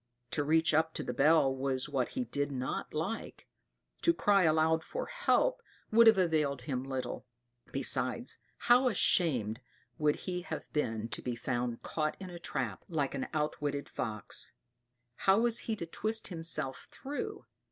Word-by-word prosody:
To 145 - 0
reach 160 +2 +3
up 160 +1 +2
to - - -2
the - - -3
bell 140 -2 +4
was 130 0 -1
what 135 -4 -1
he 255 - +1
did 145 -10 -2
not 130 -1 -3
like; 170 +9 -4 0.5
to 335 - +3
cry 200 -3 +4
aloud 160 0 +3
for - - -4
help - - +1 0.3
would 230 +1 +7
have 220 -2 +8
availed 155 -7 +1
him 130 -1 -2
little; 130 -1 -4 0.4
besides, - - 0 0.3
how 250 +2 +6
ashamed 130 - +2 0.4
would 150 -1 +3
he 180 -1 -2
have 180 - -5
been 115 -7 -1
to - - -2
be 125 -1 -3
found 120 0 -2
caught 155 -1 -2
in 185 -2 -7
a 175 - -8
trap, 130 - -3
like 150 -5 -1
an 130 - -3
outwitted 150 -2 -2
fox! 110 -3 -2 0.6
How 195 +2 +4
was 235 -1 +3
he 220 - +1
to 170 - -5
twist 215 +6 -2
himself 165 -6 -3
through! 285 +2 -6
155 Hz, 160 wpm, -32 LUFS, 135-190 Hz, 0.6 s, have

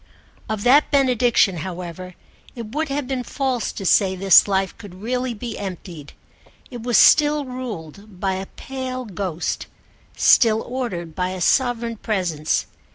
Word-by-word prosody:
Of 215 -2 -3
that 275 +5 +5
benediction, 245 - +3
however, 180 +1 -7 0.4
it 230 -2 -8
would 310 +1 -1
have 275 -1 -2
been 260 -1 -2
false 255 -1 -2
to 195 - -7
say 190 +1 +3
this 190 0 +6
life 195 -1 0
could 200 -4 -11
really 245 +4 -3
be 230 +1 -6
emptied: 175 -6 -8 0.6
it 240 -2 -7
was 240 0 +2
still 295 -1 +5
ruled 210 - -8
by 190 0 0
a 190 +1 -5
pale 255 -1 -6
ghost, 185 -4 -4 0.5
still 225 -2 +5
ordered 190 -11 -5
by 180 +2 -2
a 185 0 -5
sovereign 235 +3 +1
presence. 180 -9 -1
215 Hz, 145 wpm, -21 LUFS, 185-255 Hz, 0.6 s, this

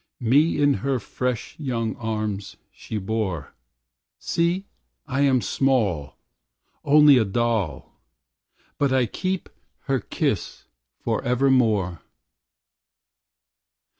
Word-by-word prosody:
Me 145 +8 +3
in 145 -1 +4
her 135 -1 0
fresh 125 +1 -3
young 115 -6 -2
arms 110 -3 -3
she 110 - -6
bore. 95 -7 -3 0.6
See, 170 +3 0 0.4
I 140 -2 -1
am 135 -3 +3
small, 100 - 0 0.7
Only 145 -2 +7
a - - +3
doll. 110 -5 -2 0.8
But 140 -2 +2
I 130 -2 +3
keep 185 - -3 0.3
her - - 0
kiss - - -3 0.4
forevermore. 120 - +1
120 Hz, 90 wpm, -24 LUFS, 105-140 Hz, 0.8 s, Only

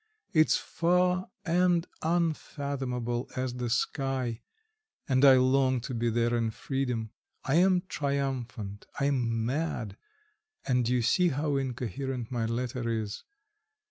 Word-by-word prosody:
It's 155 -2 +5
far 180 +2 +1 0.2
and 175 0 +3 0.2
unfathomable 140 -7 -1
as 130 -1 -2
the 125 -1 -3
sky, 130 -1 -1 0.7
and 130 -1 +2
I 135 -2 +9
long 130 0 +3
to 125 - -5
be 120 0 0
there 120 +1 +1
in 115 -1 +1
freedom. 125 -2 -3 0.3
I 135 +4 +2
am 180 0 +4
triumphant, 130 - -3
I 140 - +1
am 115 -5 0
mad, 125 -7 -2 0.7
and 125 -3 +1
you 125 -1 +2
see 180 +10 +3
how 145 -1 0
incoherent 130 -1 -3
my 115 -2 -1
letter 120 +1 -2
is. 110 -2 -3
130 Hz, 125 wpm, -29 LUFS, 120-145 Hz, 0.7 s, I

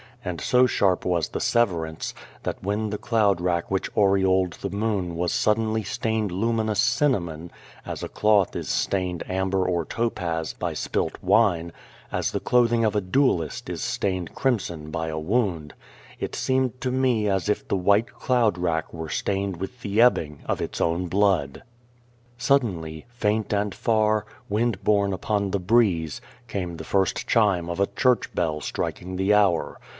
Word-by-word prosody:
And 90 -2 -4
so 125 0 +4
sharp 95 -6 +1
was 85 -7 0
the - - -4
severance, 85 -9 0 0.3
that - - -4
when 105 +3 -1
the 105 - -3
cloud 105 -6 +2
rack 85 0 -1
which 95 - 0
aureoled 95 -2 +3
the 100 - -5
moon 100 -4 -1
was 85 +1 -1
suddenly 110 +1 +1
stained 110 +1 -1
luminous 110 +2 0
cinnamon 85 - +1 0.4
as - - -5
a - - -4
cloth 105 -3 +2
is - - -4
stained 90 -3 -1
amber 95 0 0
or 85 -2 0
topaz 85 -8 -2
by - - -3
spilt - - -2
wine, 85 -7 +3 0.4
as - - -1
the - - -1
clothing 120 -1 +3
of 105 -1 +1
a 105 - +2
duellist 90 - 0
is - - -4
stained 95 -4 -2
crimson 85 - -1
by 80 0 -2
a 80 0 -3
wound 85 -4 -1 0.5
it - - -4
seemed 130 -1 0
to 130 - -1
me 125 -5 +1
as 95 0 0
if 105 - -1
the - - 0
white 100 +5 +2
cloud 120 -7 +1
rack 80 -3 -1
were 80 -1 -6
stained 100 0 -1
with 95 +8 -7
the 100 +2 -1
ebbing 75 -12 +3
of - - -1
its - - -4
own 85 +2 0
blood. 95 - +1 0.7
Suddenly, 100 - 0
faint 110 -3 -1
and 100 -1 0
far, 110 -1 +1 0.2
wind 110 -1 0
borne 100 -2 +2
upon 100 +2 -1
the 100 - -1
breeze, 90 -6 +2 0.3
came 90 -5 -4
the - - -7
first 95 -3 0
chime 100 -7 +2
of 85 +2 -4
a 100 - +3
church 125 -2 +2
bell 80 -3 0
striking 90 +5 -4
the 95 +3 +2
hour. 90 -8 +2
100 Hz, 165 wpm, -25 LUFS, 85-110 Hz, 0.7 s, so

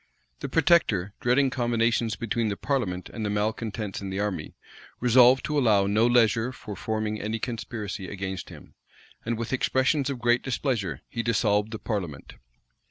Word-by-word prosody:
The - - -5
protector, 100 - +3
dreading 130 +2 +2
combinations 115 -2 +1
between 115 0 -1
the 100 -2 -2
parliament 105 -11 -2
and 110 - -4
the 105 - -1
malecontents 105 0 -2
in 100 - -5
the 95 +1 -3
army, 100 -7 -3 0.4
resolved 125 +1 +5
to 150 -1 0
allow 105 -6 +4
no 105 +4 +3
leisure 120 0 +3
for 105 -5 -8
forming 110 +1 -2
any 110 +2 -2
conspiracy 110 -4 -5
against 95 -1 -5
him; - - -13 0.5
and, 115 0 -1
with 115 +2 -4
expressions 130 +2 +1
of 140 - -3
great 120 0 +2
displeasure, 115 - -2
he 115 - -3
dissolved 110 -2 +1
the 110 - -5
parliament. 95 - -5
110 Hz, 160 wpm, -26 LUFS, 105-120 Hz, 0.5 s, resolved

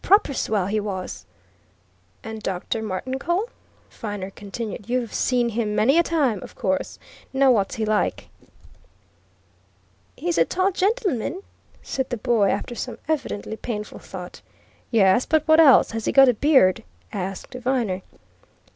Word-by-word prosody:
"Proper 395 -6 +4
swell, 210 -7 0
he 210 +3 0
was!" 195 -3 -5 1.0
"And 220 0 -7
Dr. 190 +3 -3
Martincole?" 265 - -2 0.4
Viner 205 -3 -6
continued. 210 +1 -7
"You've 245 -2 -1
seen 245 -2 +1
him 215 -2 -2
many 270 +11 +4
a - - +7
time, 285 - 0
of - - -11
course. 190 -1 -2 0.3
Now 270 0 +4
what's 200 -5 +1
he 220 - -1
like!" 215 0 -1 1.9
"He's 345 0 -1
a - - +5
tall 375 +2 +1
gentleman," 385 - -1 0.4
said 265 -1 -3
the 245 - -2
boy, 225 -3 +2
after - - -2
some 245 +1 -5
evidently 280 -9 -2
painful 210 -3 -5
thought. 180 -2 -9 0.5
"Yes, 205 0 +4
but 315 -1 +2
what 315 0 +6
else 290 -5 +7
has 225 -1 -4
he - - +1
got 270 -1 +7
a - - +4
beard?" 260 -7 +4 0.3
asked 190 0 -5
Viner. 245 -7 -1
235 Hz, 140 wpm, -23 LUFS, 205-275 Hz, 1.9 s, a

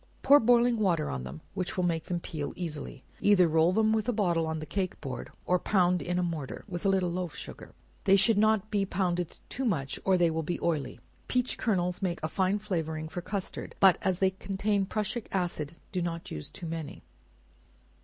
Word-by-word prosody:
Pour 285 +2 +8
boiling 240 -1 +4
water 170 -7 +1
on 65 -1 -4
them, 70 +5 -8
which 185 -2 -3
will 180 - +1
make 165 -3 0
them 175 -1 -2
peel 155 -4 -5
easily; 150 -5 -5 0.2
either 195 -4 +5
roll 160 +2 +4
them 220 +2 +3
with 220 +2 0
a - - +4
bottle 175 -7 +1
on 160 0 -2
the 155 - -5
cake 185 +1 -2
board 135 -3 -6 0.2
or 180 0 +2
pound 180 -3 +2
in 175 +4 -2
a 180 - +1
mortar, 160 -6 -4
with 175 -3 -5
a 195 - +3
little 185 -2 +2
loaf 175 -3 -3
sugar; - - -9 0.3
they 195 -1 +6
should 200 +2 +4
not 215 -1 +2
be 205 -2 +2
pounded 180 -3 -1
too 265 - -3
much 140 - -1
or 190 -1 +4
they 170 -2 +3
will 160 0 -1
be 170 +3 -3
oily; 150 -6 -1 0.3
peach 250 0 0
kernels 180 -5 0
make 180 -3 -1
a - - +1
fine 190 +4 +1
flavoring 160 -6 -3
for 175 +2 -5
custard, 195 +1 -5
but 190 -2 +6
as 185 -2 +1
they 190 0 +3
contain 195 +1 -1
prussic 215 +3 -2
acid, 170 -5 -2 0.2
do 185 - -1
not 170 -1 -4
use 75 -1 -6
too 175 - -9
many. 160 -2 -5
180 Hz, 205 wpm, -29 LUFS, 165-200 Hz, 0.3 s, Pour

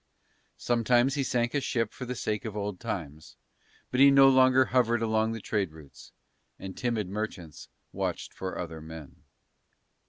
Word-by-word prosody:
Sometimes 120 +2 +2
he 145 - -1
sank 120 -2 0
a 145 - 0
ship 115 -4 -1
for 125 - -7
the 125 +1 -4
sake 105 -3 -2
of 110 -3 -6
old 100 -2 -4
times 80 -8 -6 0.6
but 125 - -1
he 140 +1 +8
no 135 0 +7
longer 130 0 +5
hovered 120 -3 +1
along 110 0 +1
the 115 - -5
trade 100 -4 -2
routes; 75 -3 -15 0.5
and 95 -1 -8
timid 115 -6 -2
merchants 95 -7 -6 0.2
watched - - -4
for 95 -1 -5
other 80 -2 -6
men. 80 -2 -10
110 Hz, 160 wpm, -28 LUFS, 95-125 Hz, 0.6 s, he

